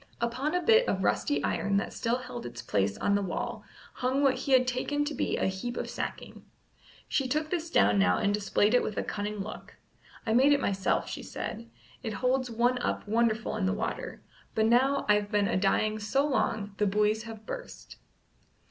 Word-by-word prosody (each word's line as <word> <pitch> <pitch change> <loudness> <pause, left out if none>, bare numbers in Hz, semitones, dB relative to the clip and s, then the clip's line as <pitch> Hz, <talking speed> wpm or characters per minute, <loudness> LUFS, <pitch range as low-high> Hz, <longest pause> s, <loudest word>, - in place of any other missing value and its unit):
Upon 255 +7 -1
a 360 - 0
bit 460 +2 +5
of - - 0
rusty 290 - +1
iron 200 0 0
that 200 - -2
still 235 +1 0
held 255 - -7
its 120 0 -7
place 100 -1 0
on 200 - +1
the 200 - +2
wall 190 -3 -4 0.3
hung 260 +3 0
what 270 -2 +5
he 265 +2 -4
had 255 -1 +6
taken 290 +4 0
to 300 - -3
be - - -1
a - - 0
heap 190 +6 -3
of - - -3
sacking. - - -6 0.6
She 270 - 0
took 305 +3 -1
this 340 -2 -2
down 205 - +4
now 195 - +4
and 205 -1 +1
displayed 205 +1 +2
it 250 - +5
with 215 - -4
a - - 0
cunning 205 0 -4
look. 210 +2 -8 0.5
"I 220 - +1
made 270 +5 +6
it 285 - +3
myself," 195 -6 0
she - - -5
said, 230 +2 -6 0.3
"it 225 -3 -4
holds 255 +4 0
one 240 +2 +1
up 245 - -2
wonderful 220 0 +1
in 200 -3 0
the 190 - +1
water; 215 +2 -4 0.3
but 220 - +3
now 260 +5 +3
I've 210 0 +3
been 205 -2 +2
a 230 - 0
dying 215 +3 +1
so 240 +7 +1
long 215 -7 -1
the 210 - +2
buoys 210 +2 +2
have 220 -1 -10
burst." - - -8
225 Hz, 200 wpm, -29 LUFS, 205-260 Hz, 0.6 s, had